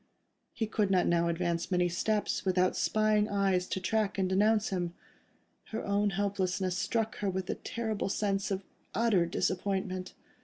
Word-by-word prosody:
He 225 - -2
could 210 -2 0
not 185 -2 +3
now 170 0 +2
advance 170 0 -1
many 180 -1 +2
steps, 205 +4 0
without 185 -1 +2
spying 215 -1 +2
eyes 195 -2 +1
to - - -2
track 210 +1 0
and 190 -1 +1
denounce 210 +3 +3
him. 175 -3 -2 0.7
Her 220 - -5
own 205 +1 +2
helplessness 190 -2 -1
struck 225 +3 -1
her 205 - -1
with 190 0 -2
the - - -2
terrible 220 -4 -3
sense 195 -1 0
of 195 0 -2 0.3
utter 210 -7 +3
disappointment. 185 +1 -2
195 Hz, 155 wpm, -31 LUFS, 185-210 Hz, 0.7 s, not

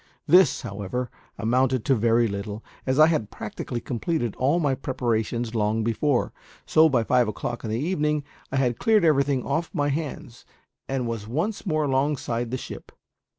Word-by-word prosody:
This, 180 -6 +5
however, 105 +5 -4 0.3
amounted 125 +2 +1
to 135 - +4
very 115 0 +3
little, 100 +1 -5 0.2
as 130 +1 +1
I 155 - +8
had 155 -10 0
practically 120 - -5
completed 120 - -2
all 140 +7 +2
my 145 -5 +1
preparations 120 -3 -2
long 110 0 +1
before; 120 +4 0 0.3
so 160 0 +5
by 125 -5 +2
five 125 0 +3
o' - - -1
clock 120 +3 -5
in 110 - -4
the 110 - -1
evening 150 -2 0 0.3
I - - -2
had 125 -3 +1
cleared 215 -5 +4
everything 140 -4 +2
off 165 +1 -1
my 145 -2 +1
hands, 140 -5 -5 0.5
and 135 -2 -1
was 115 -3 -4
once 175 - -2
more 155 -3 +1
alongside 135 -4 0
the 130 - -2
ship. - - -9
130 Hz, 170 wpm, -25 LUFS, 115-150 Hz, 0.5 s, I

